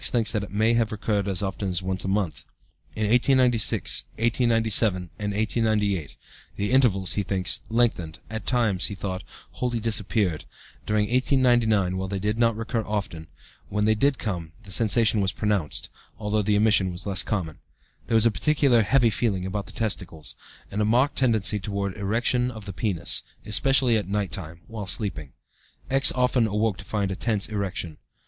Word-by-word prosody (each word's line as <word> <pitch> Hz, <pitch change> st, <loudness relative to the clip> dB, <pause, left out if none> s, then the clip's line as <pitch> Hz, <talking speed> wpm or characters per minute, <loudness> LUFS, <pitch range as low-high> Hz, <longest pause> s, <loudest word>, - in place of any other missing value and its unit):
thinks 115 Hz, -3 st, +2 dB
that 105 Hz, -3 st, -1 dB
it -, -, -7 dB
may 110 Hz, +3 st, +2 dB
have 115 Hz, -2 st, +1 dB
recurred 105 Hz, -2 st, -1 dB
as 95 Hz, 0 st, -1 dB
often 95 Hz, 0 st, -3 dB
as 90 Hz, 0 st, -2 dB
once 95 Hz, 0 st, -2 dB
a -, -, -4 dB
month. 95 Hz, -4 st, -1 dB, 0.5 s
In 110 Hz, -, -2 dB
1896, 120 Hz, -, +2 dB
1897, 115 Hz, -5 st, +1 dB
and 105 Hz, 0 st, -2 dB
1898, 105 Hz, -5 st, 0 dB, 0.4 s
the 100 Hz, +2 st, -2 dB
intervals, 105 Hz, -9 st, +3 dB
he 105 Hz, -, 0 dB
thinks, 95 Hz, -2 st, -2 dB
lengthened 110 Hz, -8 st, 0 dB
at 110 Hz, -2 st, -7 dB
times, 110 Hz, -7 st, +2 dB
he 100 Hz, -, -6 dB
thought, 95 Hz, 0 st, -5 dB, 0.3 s
wholly 120 Hz, -2 st, -2 dB
disappeared. 105 Hz, -6 st, 0 dB, 0.4 s
During 105 Hz, 0 st, +1 dB
1899, 120 Hz, -7 st, +2 dB
while 95 Hz, 0 st, -3 dB
they 100 Hz, +1 st, -3 dB
did 105 Hz, +3 st, -2 dB
not 115 Hz, -2 st, +2 dB
recur 115 Hz, 0 st, -2 dB
often, 100 Hz, -7 st, -4 dB, 0.4 s
when 105 Hz, +1 st, 0 dB
they 110 Hz, -, +4 dB
did 135 Hz, +5 st, +1 dB
come 85 Hz, -6 st, -5 dB
the 100 Hz, -, -11 dB
sensation 110 Hz, 0 st, +3 dB
was 95 Hz, -1 st, +1 dB
pronounced, 105 Hz, -8 st, -2 dB, 0.3 s
although 105 Hz, 0 st, -1 dB
the 105 Hz, 0 st, +1 dB
emission 105 Hz, -3 st, +3 dB
was 90 Hz, +1 st, -8 dB
less 95 Hz, -2 st, +3 dB
common. 90 Hz, -8 st, -3 dB, 0.5 s
There 115 Hz, -, 0 dB
was 110 Hz, 0 st, +5 dB
a 115 Hz, -, +4 dB
peculiar 140 Hz, -2 st, +3 dB
'heavy' 120 Hz, +1 st, +3 dB
feeling 100 Hz, -5 st, -1 dB
about 100 Hz, +1 st, -4 dB
the -, -, -9 dB
testicles, 90 Hz, -8 st, -4 dB, 0.4 s
and 105 Hz, -, -2 dB
a -, -, +3 dB
marked 125 Hz, +7 st, +2 dB
tendency 110 Hz, -5 st, +1 dB
towards 100 Hz, -1 st, -3 dB
erection 115 Hz, +4 st, 0 dB
of 110 Hz, -4 st, -9 dB
the 100 Hz, -, -6 dB
penis, 90 Hz, -2 st, 0 dB, 0.2 s
especially 130 Hz, +1 st, +3 dB
at 100 Hz, -3 st, -4 dB
night 100 Hz, -3 st, -1 dB
time 85 Hz, 0 st, -5 dB
(while 110 Hz, -4 st, -7 dB
sleeping). 90 Hz, -, -1 dB, 0.6 s
X. 135 Hz, 0 st, +6 dB
often 125 Hz, -2 st, +2 dB
awoke 105 Hz, -1 st, 0 dB
to 95 Hz, -, -10 dB
find 100 Hz, -2 st, -2 dB
a -, -, -3 dB
tense 105 Hz, -1 st, 0 dB
erection. 100 Hz, -6 st, -4 dB
105 Hz, 175 wpm, -25 LUFS, 95-115 Hz, 0.6 s, X